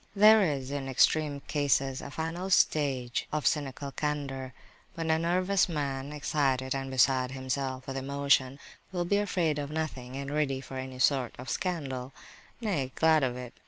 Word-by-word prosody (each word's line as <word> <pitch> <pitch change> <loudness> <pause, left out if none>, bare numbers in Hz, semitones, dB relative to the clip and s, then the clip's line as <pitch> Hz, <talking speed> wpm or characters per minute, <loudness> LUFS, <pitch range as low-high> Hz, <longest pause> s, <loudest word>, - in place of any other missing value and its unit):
There 215 +2 +8
is, 140 -7 -1
in 140 -2 -3
extreme 145 +2 +2
cases, 140 -3 0
a - - -7
final 165 +5 -4
stage 135 -9 +2
of 150 -1 -2
cynical 140 -1 -1
candour 135 -3 -3 0.4
when 165 -1 -1
a 160 - +3
nervous 185 +3 +2
man, 140 -3 -3
excited, 135 -3 0
and 135 -1 -3
beside 130 0 +2
himself 130 0 -3
with 135 0 -4
emotion, 140 -1 +1 0.3
will 175 -2 -1
be 200 +4 +2
afraid 175 -7 0
of 145 -1 -4
nothing 145 -5 -4
and 140 +1 -4
ready 145 -3 0
for 130 0 -8
any 130 0 -6
sort 130 -2 +2
of 125 -1 -6
scandal, 135 -8 -3 0.5
nay, 160 - -1
glad 160 -1 +4
of 125 -1 0
it. 125 -1 -8
140 Hz, 160 wpm, -29 LUFS, 130-155 Hz, 0.5 s, There